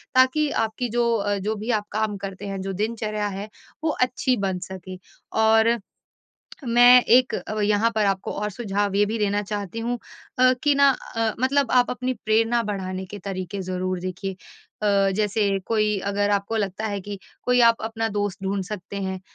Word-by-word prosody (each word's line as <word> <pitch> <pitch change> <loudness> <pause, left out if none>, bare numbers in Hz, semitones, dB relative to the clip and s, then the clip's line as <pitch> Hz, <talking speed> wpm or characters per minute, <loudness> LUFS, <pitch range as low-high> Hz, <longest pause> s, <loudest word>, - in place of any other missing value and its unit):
ताकि 260 +4 +4 0.2
आपकी 235 +3 -4
जो 235 +1 +1
अ, 205 -1 0
जो 210 +3 -2
भी 215 +3 -3
आप 210 -2 0
काम 215 -1 -1
करते 195 0 -7
हैं, 195 -1 -4
जो 195 0 -4
दिनचर्या 215 +1 -2
है, 200 +1 -6 0.3
वो 320 - +2
अच्छी 255 0 +1
बन 190 -3 -1
सके। 185 0 -8 0.4
और 220 +1 +4 0.9
मैं 245 +1 +8
एक 250 +2 +4
अब 215 - -4
यहाँ 210 +2 +3
पर 215 -1 +2
आपको 195 -1 -1
और 210 0 -3
सुझाव 205 -2 -2
ये 205 +1 +4
भी 225 +2 -2
देना 205 -1 +1
चाहती 205 0 -5
हूँ 240 +1 -2 0.4
अ, 255 0 +6
कि 290 -1 +4
ना 280 0 +6 0.3
अ, 225 -1 +1
मतलब 270 0 +2
आप 250 -1 +4
अपनी 255 +1 -2
प्रेरणा 225 +2 +2
बढ़ाने 190 -3 -4
के 205 +3 -8
तरीके 190 0 -5
ज़रूर 185 0 -2
देखिए 185 +1 -5 0.5
अ, 200 -2 +3
जैसे 205 -1 +1
कोई 215 -2 +1
अगर 205 0 +1
आपको 200 +2 0
लगता 205 0 -2
है 205 -2 -3
कि 200 +1 -7 0.3
कोई 250 0 +3
आप 230 -1 +5
अपना 225 0 -2
दोस्त 205 -2 -2
ढूँढ 195 0 -1
सकते 200 0 -7
हैं, 190 -1 -3
210 Hz, 185 wpm, -24 LUFS, 195-230 Hz, 0.9 s, मैं